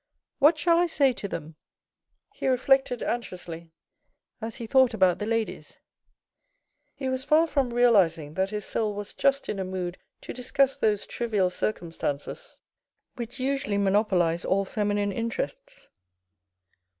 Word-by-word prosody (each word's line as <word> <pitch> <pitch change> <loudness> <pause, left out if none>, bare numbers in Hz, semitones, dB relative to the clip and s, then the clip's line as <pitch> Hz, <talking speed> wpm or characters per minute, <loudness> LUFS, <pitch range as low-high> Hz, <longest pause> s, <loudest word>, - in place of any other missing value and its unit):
" - - -64
What 300 +3 +6
shall 335 +2 +3
I 350 - +3
say 280 -5 +3
to 200 - -5
them? 155 -4 -7 0.4
" - - -64 0.3
he - - -3
reflected 260 -1 +2
anxiously, 175 -8 -5 0.7
as 225 +1 -5
he 235 - -6
thought 260 0 +4
about 185 -4 +3
the 210 - -3
ladies. 225 -1 -3 1.2
He 265 - -4
was 260 0 -1
far 305 +3 +4
from 275 -6 0
realising 190 -11 +3
that 190 +3 0
his 210 -1 -4
soul 215 -2 -1
was 205 0 -6
just 275 0 +1
in 200 - -3
a - - -1
mood 185 -1 -4 0.2
to - - -7
discuss 270 +2 +1
those 210 -2 +1
trivial 210 -6 0
circumstances 170 - -4 0.6
which 240 +2 -6
usually 270 -5 -1
monopolise 190 -4 +2
all 195 +1 +1
feminine 205 0 -1
interests. - - -5
220 Hz, 145 wpm, -26 LUFS, 190-265 Hz, 1.2 s, What